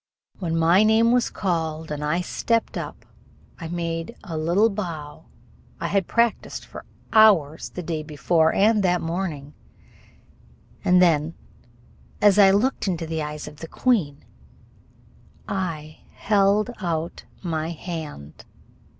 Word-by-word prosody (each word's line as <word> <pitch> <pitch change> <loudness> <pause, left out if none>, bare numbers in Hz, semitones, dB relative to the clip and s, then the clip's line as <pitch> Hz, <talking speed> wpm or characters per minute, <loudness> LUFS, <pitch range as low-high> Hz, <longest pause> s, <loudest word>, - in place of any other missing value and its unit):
When 165 -4 -2
my 170 +4 +5
name 220 +2 +4
was 245 0 +2
called 160 -4 -2
and 150 0 -4
I 160 +4 0
stepped 230 +5 -1
up, - - -6 0.5
I 165 - -6
made 165 +3 -4
the 165 - -5
little 175 +8 +2
bow 165 -7 -6 0.5
I - - -2
had 195 -3 +1
practised 235 -1 0
for - - -11 0.3
hours 185 -9 +4
the 180 - -7
day 160 -1 -3
before 160 +2 +1
and 215 +1 +3
that 180 -2 +2
morning; 165 -4 -4 1.3
and 180 0 +5
then, 160 -1 +2 0.8
as 205 -1 +5
I 195 -1 +8
looked 210 +5 +1
into 170 -3 -2
the 160 0 -3
eyes 150 0 -5
of 150 0 -11
the 165 - -8
queen, 160 - 0 1.2
I 160 -5 -4 0.2
held 205 +2 +2
out 165 -2 -3 0.2
my 160 -2 -2
hand! 160 - -7
170 Hz, 130 wpm, -23 LUFS, 155-200 Hz, 1.3 s, I